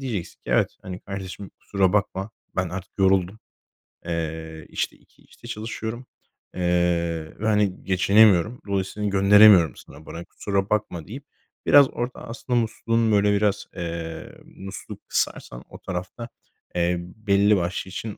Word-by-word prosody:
diyeceksin 115 -10 -4
ki: - - -8
"Evet, - - +2
hani, 90 0 -7
kardeşim 95 0 -7
kusura 95 -2 +1
bakma. 100 0 0 0.3
Ben 95 -1 0
artık 95 +2 -7
yoruldum. 95 +1 +2 0.7
Eee, 80 -2 -4
işte, - - -2
2 - - -28
işte 120 - -15
çalışıyorum, 110 +2 -5 0.5
eee, 85 -2 0
ve, 110 - -1
hani, 105 -3 +1
geçinemiyorum. 100 +3 +4
Dolayısıyla 100 +1 -1
gönderemiyorum 100 - +7
sana 75 +3 -14
para. 85 +2 -8
Kusura 100 0 -2
bakma." 95 -6 -1
deyip 135 +7 -8 0.4
biraz 140 -2 +7
orada 125 +1 -5
aslında 120 +1 -1
musluğun, 115 0 0
böyle, 105 0 +4
biraz 100 0 +1
eee, 85 -1 -5
musluğu 95 0 -9
kısarsan - - -2
o - - -11
tarafta, 95 +6 -6 0.5
eee, 90 0 +1
belli 100 +2 +2
başlı 90 +2 -2
için 105 +3 -6
95 Hz, 135 wpm, -24 LUFS, 90-105 Hz, 0.7 s, gönderemiyorum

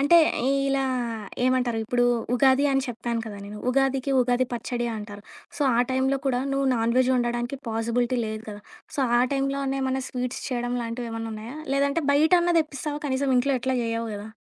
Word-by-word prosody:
అంటే 285 +5 +6 0.5
ఇలా 275 0 +1 0.6
ఏమంటారు, 250 -3 +1
ఇప్పుడు 245 +2 +1 0.3
ఉగాది 265 +2 +4
అని 270 0 +2
చెప్పాను 235 0 -3
కదా 210 -2 -7
నేను. 210 +1 -8
ఉగాదికి 270 +1 +1
ఉగాది 250 +1 +2
పచ్చడి 240 +1 -2
అంటారు. 205 -1 -8 0.3
సో 295 - -1
ఆ - - +2
టైంలో 265 +1 +1
కూడా 250 -2 +1
నువ్వు 275 0 +1
నాన్‌వెజ్ 240 +3 +2
వండడానికి 240 +2 -1
పాసిబిలిటీ 235 +2 0
లేదు 215 0 -5
కదా! 205 0 -7 0.4
సో - - 0 0.2
ఆ - - +4
టైంలో 275 0 0
నేమన్నా 265 -1 -1
స్వీట్స్ 250 -1 -4
చేయడం 245 -1 -2
లాంటివేమన్నున్నాయా? 230 +1 -5 0.2
లేదంటే 280 +3 +1
బయటన్నా 345 +4 +4
తెప్పిస్తావా 295 0 -4
కనీసం? 265 0 0
ఇంట్లో 275 +2 +2
ఎట్లా 260 +1 0
చెయ్యవు 230 0 -2
కదా! 205 +1 -7
250 Hz, 160 wpm, -25 LUFS, 230-275 Hz, 0.6 s, అంటే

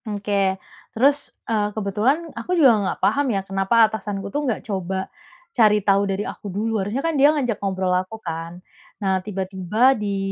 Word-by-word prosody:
Oke. 200 -2 0 0.4
Terus, 280 +4 +2 0.2
eee, 210 -2 0
kebetulan 240 - 0
aku 350 +11 -2
juga 270 -7 +7
nggak 195 - -2
paham 285 0 +2
ya, 200 -4 0
kenapa 195 +4 +3
atasanku 205 -2 -5
tuh 290 -2 -1
nggak 230 - -3
coba 190 -2 -3 0.5
cari 215 -5 +5
tahu 200 0 +3
dari 195 +2 -2
aku 205 - -7
dulu. 215 +3 -1
Harusnya 225 +10 -3
kan 330 - +1
dia 285 +2 +7
ngajak 260 -8 -1
ngobrol 190 -2 0
aku 185 +4 -2
kan. 165 -3 -6 0.4
Nah, 190 -1 +1
tiba-tiba 195 +5 +1
di 205 -2 -2
205 Hz, 170 wpm, -22 LUFS, 195-230 Hz, 0.5 s, juga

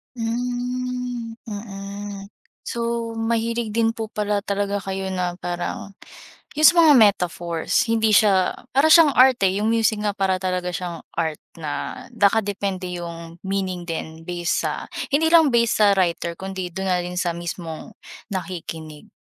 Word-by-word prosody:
Hmm. 245 0 -3
Mm. 200 -1 -7 0.4
So, 235 -1 -2
mahilig 230 0 -1
din 225 -1 +3
po 220 -1 -4
pala 210 -1 0
talaga 200 0 -1
kayo 190 0 -3
na 180 -1 -2
parang 175 +3 -4 0.6
'yung 310 +2 +7
sa - - +4
mga 320 -3 +8
metaphors 175 -5 +2
hindi 220 -1 +3
siya 195 -4 +4 0.2
para 275 +4 +4
siyang 325 -4 +8
art 255 -1 +6
eh. 190 +1 +3
'Yung 210 - 0
music 225 -1 +2
nga 210 -1 -1
para 190 -2 +1
talaga 180 -1 -2
siyang 175 -2 -5
art 160 -2 -2 0.2
na 160 - -5
nakadepende 200 -3 +1 0.2
'yung 170 0 -9
meaning 190 -2 -2
din 165 -1 -6
base 175 0 -1
sa - - -3 0.2
hindi 300 +3 +3
lang 320 -3 +6
base 235 -2 +3
sa 210 - +7
writer 170 -1 0
kundi 190 -2 -5
do'n 190 +3 -4
na 180 -1 +1
rin 180 0 -5
sa 175 -2 0
mismong 170 +1 -6 0.4
nakikinig. 165 -5 -6
200 Hz, 145 wpm, -22 LUFS, 180-230 Hz, 0.6 s, mga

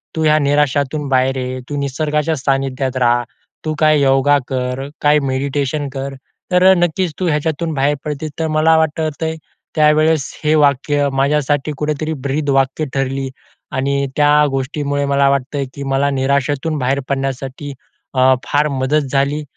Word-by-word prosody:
तू 160 - -1
ह्या 155 0 +4
निराशातून 145 0 +1
बाहेर 130 0 +2
ये. 130 0 -3
तू 145 - -3
निसर्गाच्या 150 +3 -1
सानिध्यात 135 -1 -1
रहा. 120 -1 +2 0.4
तू 155 - -1
काय 155 -1 +4
योगा 135 +1 +4
कर, 130 +1 -3
काय 150 +1 +4
मेडिटेशन 140 +2 -1
कर. 135 0 -4 0.4
तर 180 0 +4
नक्कीच 175 0 0
तू 185 - 0
ह्याच्यातून 160 +1 -1
बाहेर 140 +1 +1
पडशील. 150 +1 -4
तर 160 - 0
मला 155 +1 +3
वाटतंय 160 0 -1 0.4
त्यावेळेस 155 -1 +3
हे 155 +1 +3
वाक्य 145 0 +2
माझ्यासाठी 145 +1 +1
कुठेतरी 150 +1 -2
ब्रीदवाक्य 135 0 0
ठरली 135 0 -2 0.4
आणि 140 +1 0
त्या 150 0 +5
गोष्टीमुळे 140 +1 -2
मला 140 0 +3
वाटतंय, 140 +1 -1
की 140 - -7
मला 135 +1 +1
निराशेतून 140 +3 0
बाहेर 135 +1 0
पडण्यासाठी 135 +1 -3 0.4
अ, 130 0 +5
फार 150 +1 +1
मदत 140 +2 +1
झाली 140 +2 0
140 Hz, 140 wpm, -17 LUFS, 135-150 Hz, 0.4 s, त्या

